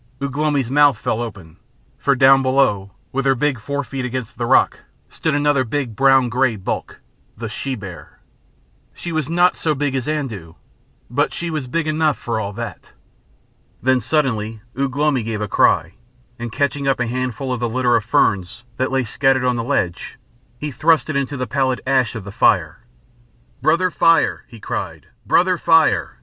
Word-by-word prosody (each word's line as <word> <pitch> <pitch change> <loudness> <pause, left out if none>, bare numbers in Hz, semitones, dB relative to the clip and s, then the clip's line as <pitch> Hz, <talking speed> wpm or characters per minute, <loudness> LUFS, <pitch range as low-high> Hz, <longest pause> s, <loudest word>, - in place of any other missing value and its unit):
Ugh 140 -1 -4
lomi's 145 -4 0
mouth 145 -3 +5
fell 115 +1 -2
open. 100 -9 -8 0.4
For 140 - +2
down 135 +1 +6
below, 130 -7 +1 0.2
with 135 +1 -1
her 135 - +4
big 135 -1 0
fore 140 +5 -3
feet 135 -1 -5
against 125 -2 -4
the - - -1
rock, - - +3 0.3
stood 160 -3 -1
another 145 -2 +2
big 125 -1 -3
brown 135 0 +4
grey 125 0 +1
bulk 95 - -5 0.4
the 115 - -5
she 130 +5 -4
bear. 90 -9 -10 0.8
She 175 - -6
was 155 -3 -2
not 175 +2 +3
so 155 -2 0
big 145 0 -1
as 130 -1 -2
Andoo, 115 - -4 0.5
but 140 +5 0
she 170 -1 -3
was 150 -5 -3
big 165 +5 -1
enough 155 -1 +1
for 115 -2 -3
all 100 -2 -3
that. 115 -4 -8 0.9
Then 130 0 +3
suddenly 115 -6 -1
Ugh 135 0 -2
lomi 145 -3 +2
gave 110 -1 -4
a 105 - -2
cry, - - +2 0.5
and 120 -1 -5
catching 140 +2 -1
up 135 -2 +1
a 120 - +1
handful 130 +2 -3
of 125 - -3
the 120 0 -1
litter 125 0 +2
of 115 - +1
ferns 100 -1 0
that 130 +1 -1
lay 135 -1 +1
scattered 130 +2 +1
on 125 -1 +2
the 115 - -2
ledge, 105 -9 -2 0.4
he 150 +3 -5
thrust 155 +4 +2
it - - -5
into 140 +1 -1
the 125 - -2
pallid 130 -1 0
ash 130 -3 +1
of 110 - -5
the 100 - -8
fire. - - +1 0.7
"Brother 165 +6 +2
Fire!" 165 -1 +2
he 115 -3 -13
cried, - - -5 0.2
"Brother 180 0 +3
Fire!" 165 -1 +3
130 Hz, 180 wpm, -20 LUFS, 115-145 Hz, 0.9 s, down